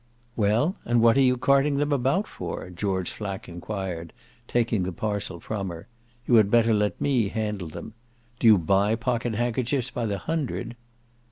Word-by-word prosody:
"Well, 115 - +1
what 115 0 +4
are 135 - +4
you 125 -1 +4
carting 140 +3 +3
them 145 +1 0
about 140 - +1
for?" 90 - -6
George 95 0 -2
Flack 100 -3 -6
enquired, 85 -2 -5 0.3
taking 115 -4 +1
the 90 +1 -2
parcel 100 -1 -3
from 100 0 -4
her. 85 -1 -9 0.4
"You - - 0
had 105 -2 +5
better 115 0 +4
let 105 -1 0
me 125 -7 +2
handle 105 -4 -3
them. 95 +7 -9 0.5
Do 115 - +3
you 110 -2 +8
buy 100 +5 +2
pocket 120 -1 -1
handkerchiefs 120 +2 -1
by 115 - -2
the 100 -1 -1
hundred?" 140 -4 -3
110 Hz, 165 wpm, -25 LUFS, 100-125 Hz, 0.5 s, you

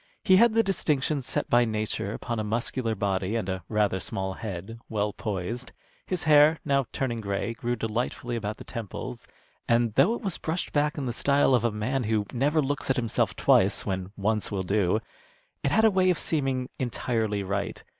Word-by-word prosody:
He 185 -3 +6
had 230 +1 +5
the 225 - +5
distinction 155 -7 0
set 130 - -2
by 120 0 +4
nature 110 -3 -2
upon 120 +1 -4
a - - -1
muscular 115 +1 -1
body 95 +1 -1
and 110 -5 -1
a 95 -2 -3
rather 105 -3 +1
small 95 0 -3
head, 100 +2 -6
well 105 -1 -1
poised. 110 +4 -4 0.3
His 185 -2 -1
hair, 155 +1 +6
now 140 -3 +2
turning 120 -4 -2
gray, 100 +3 -2
grew 120 +1 -2
delightfully 120 +2 -2
about 110 -2 -3
the - - -9
temples, 115 -6 -7 0.4
and 115 -1 +2
though 155 - +4
it - - -7
was 195 -7 -2
brushed 165 +3 -3
back 150 +1 +1
in 140 - -2
the 120 - -2
style 140 +2 +3
of 120 -2 +3
a 120 - +3
man 115 +5 -1
who 105 -1 +1
never 145 +5 +2
looks 145 0 -2
at 130 - +3
himself 115 -3 0
twice - - +3
when 95 0 -3
once 105 +1 0
will 100 -3 -2
do, 100 +2 +1 0.6
it - - +1
had 220 +9 +4
a 220 - +6
way 185 -1 +3
of 180 - +2
seeming 135 -6 -1
entirely 110 -4 -1
right. 100 +1 -3
115 Hz, 195 wpm, -27 LUFS, 105-140 Hz, 0.6 s, He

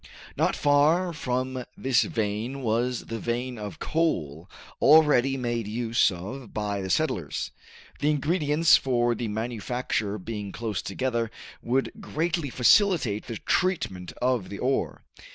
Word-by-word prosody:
Not - - +1
far 155 +5 +3
from 130 -3 -2
this 130 -4 +3
vein 110 +5 -2
was 120 +2 0
the 115 0 -5
vein 120 +1 -3
of 105 -1 -6
coal 85 - -1 0.3
already 140 -3 +5
made 120 -3 -2
use 115 +2 +2
of 105 +7 -7
by 105 -2 -2
the 95 - -4
settlers. - - -1 0.5
The 145 - +2
ingredients 150 +1 +3
for 120 -2 +1
the 120 0 -3
manufacture 110 -1 -2
being 105 0 -6
close 110 -2 -3
together 120 +1 -2 0.3
would 130 +3 0
greatly 165 -5 -2
facilitate 130 - +3
the 115 -2 -4
treatment 110 - -1
of 125 -7 -1
the 100 - -6
ore. 130 +4 -1
120 Hz, 130 wpm, -26 LUFS, 110-140 Hz, 0.5 s, already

